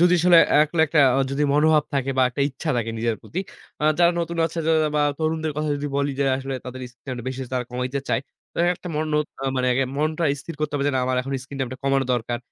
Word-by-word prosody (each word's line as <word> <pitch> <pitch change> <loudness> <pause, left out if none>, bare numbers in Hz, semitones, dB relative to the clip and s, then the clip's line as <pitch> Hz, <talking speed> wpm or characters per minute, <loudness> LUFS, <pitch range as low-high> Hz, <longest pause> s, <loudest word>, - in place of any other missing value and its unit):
যদি 175 +1 +5
আসলে 175 -1 +7 0.2
একলা 160 +2 0
একটা 150 +1 +3 0.3
যদি 140 +2 -1
মনোভাব 155 +1 +4
থাকে 135 0 0
বা - - +6
একটা 125 - -5
ইচ্ছা 145 +3 -4
থাকে 115 -1 -1
নিজের 115 0 0
প্রতি। 180 - -4 0.4
আ - - +2
যারা 175 0 +5
নতুন 170 0 -3
আছে 165 - -7 0.4
বা - - +3 0.2
তরুণদের 160 0 -1
কথা 150 0 -1
যদি 145 - -4
বলি 140 0 +1
যে, 140 - +2
আসলে 135 0 -4
তাদের 125 0 -7
স্ক্রিনটাইমটা 125 0 -8
বেশি 130 0 -5
তারা 125 -1 -1
কমাইতে 125 +2 -2
চায়। - - +2 0.3
তো - - -6 0.2
একটা 180 - -9
মন 155 +1 0 0.5
মানে 125 - +1
আগে 135 +2 +2
মনটা 155 +3 0 0.2
স্থির 165 +4 -8
করতে 150 -1 -1
হবে 140 - 0
যে, - - 0
না 130 - +2
আমার 130 - 0
এখন 135 +2 -5
স্ক্রিন 135 +1 -9
টাইমটা 130 0 -3
কমানো 135 -1 +2
দরকার। 120 0 -2
140 Hz, 225 wpm, -23 LUFS, 130-155 Hz, 0.5 s, আসলে